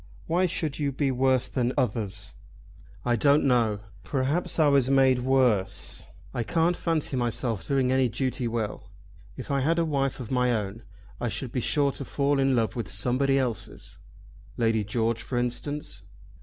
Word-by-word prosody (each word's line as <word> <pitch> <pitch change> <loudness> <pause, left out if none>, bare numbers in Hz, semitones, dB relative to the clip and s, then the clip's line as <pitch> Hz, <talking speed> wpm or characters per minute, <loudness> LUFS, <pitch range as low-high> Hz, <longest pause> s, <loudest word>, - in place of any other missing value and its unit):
"Why 180 +3 +2
should 155 -3 -2
you 145 -2 0
be 135 0 0
worse 130 0 +2
than 125 -1 -1
others?" 105 -5 -2 0.7
"I 120 -1 +2
don't 140 +5 +4
know. 115 -6 +2 0.2
Perhaps 140 +6 0
I 155 -2 +5
was 140 -3 +3
made 135 -2 +4
worse. 125 -6 +1 0.3
I 120 - -1
can't 165 +8 +1
fancy 160 -5 -1
myself 120 -3 -1
doing 135 -2 +2
any 130 -1 +3
duty 125 +2 -2
well. 115 -2 -4 0.5
If - - -6
I 140 - +2
had 165 +5 +2
a 170 - +2
wife 135 -4 -1
of 125 -2 -7
my 125 -1 +2
own 105 0 -3 0.4
I 120 - -1
should 125 +1 -4
be 125 - -1
sure 140 +2 +2
to 140 - -7
fall 140 +1 0
in 135 -1 +3
love 115 -2 0
with 120 - -4
somebody 135 +2 +1
else's." 125 -6 -4 0.6
"Lady 115 -2 +2
George 115 +2 -1
for 125 - -4
instance." 125 +5 -3
130 Hz, 170 wpm, -27 LUFS, 120-140 Hz, 0.7 s, I